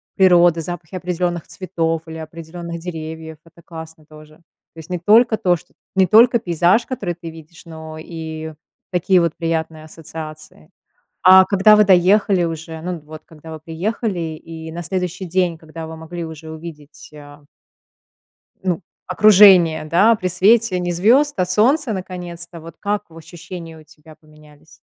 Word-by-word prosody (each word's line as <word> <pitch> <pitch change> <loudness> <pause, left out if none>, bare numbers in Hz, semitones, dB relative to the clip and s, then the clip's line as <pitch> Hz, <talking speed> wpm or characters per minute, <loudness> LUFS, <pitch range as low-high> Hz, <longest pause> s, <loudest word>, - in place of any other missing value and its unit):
природы, 175 -3 +4
запахи 175 +1 -7
определённых 175 -1 -3
цветов 165 -3 -3
или 160 0 -8
определённых 165 +2 -8
деревьев. 160 -2 -7
Это 165 +1 -20
классно 160 -2 -11
тоже. 155 0 -16
То 165 0 -21
есть 160 - -12
не 180 -1 -3
только 220 +5 +4
то, 180 -3 +2
что - - -22 0.2
не 190 -1 +4
только 235 +5 +6
пейзаж, 175 +3 +2
который 205 -9 -4
ты 170 -1 -9
видишь, 160 +1 -14
но 160 -1 -10
и 160 -1 -7 0.4
такие 185 +1 +2
вот 170 -2 0
приятные 160 -2 -3
ассоциации. 155 - -11 0.5
А 185 0 +8
когда 200 +2 +5
вы 210 - +5
доехали 190 0 +3
уже, 165 0 -6
ну, 180 0 -4
вот 155 +1 -12
когда 160 0 -13
вы 160 - -8
приехали 185 +6 -3 0.2
и 160 0 -10
на 170 +1 -6
следующий 185 +1 -4
день, 175 -1 0
когда 160 0 -9
вы 160 0 -9
могли 165 +2 -7
уже 160 0 -9
увидеть, 155 -2 -11
а 145 0 -14 1.2
ну, 185 0 -1 0.3
окружение, 185 -5 +6
да, 195 +9 +4
при 185 -4 -3
свете 200 +2 +3
не 175 0 -2
звёзд, 245 - +3
а 185 - +1
солнца 230 - +2
наконец-то? 175 -2 -7
Вот 165 0 -12
как 205 0 -2
в 165 - -15
ощущения 165 0 -10
у - - -16
тебя 155 0 -18
поменялись? 155 0 -21
170 Hz, 155 wpm, -19 LUFS, 160-185 Hz, 1.2 s, А